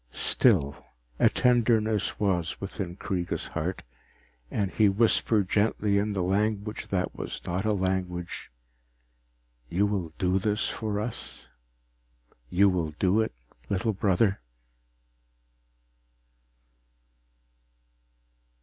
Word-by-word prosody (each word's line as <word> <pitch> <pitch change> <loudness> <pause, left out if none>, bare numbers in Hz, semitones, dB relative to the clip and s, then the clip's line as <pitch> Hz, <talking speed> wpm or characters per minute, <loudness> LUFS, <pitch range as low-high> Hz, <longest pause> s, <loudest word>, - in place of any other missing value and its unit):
Still, 80 - +3 0.4
a - - +6
tenderness 110 -3 +2
was 90 -5 0
within 95 -2 -5
Kreega's 90 -3 -3
heart, - - -3 0.7
and 100 -3 -1
he 105 -2 +4
whispered 110 -1 +2
gently 105 0 +2
in 105 +1 -1
the 95 -2 -1
language 105 +2 -1
that 90 -2 -1
was - - -5
not 90 +4 -2
a 110 - +2
language, 95 -2 -2 1.2
_You 100 +4 +2
will 95 -5 -2
do 95 +1 +1
this 105 +1 0
for 105 -2 -3
us? 110 +2 -6 1.0
You 100 +3 +4
will 90 -4 0
do 95 +3 +2
it, 110 - -1 0.4
little 105 +3 0
brother? 95 - +1
100 Hz, 100 wpm, -27 LUFS, 90-105 Hz, 1.2 s, a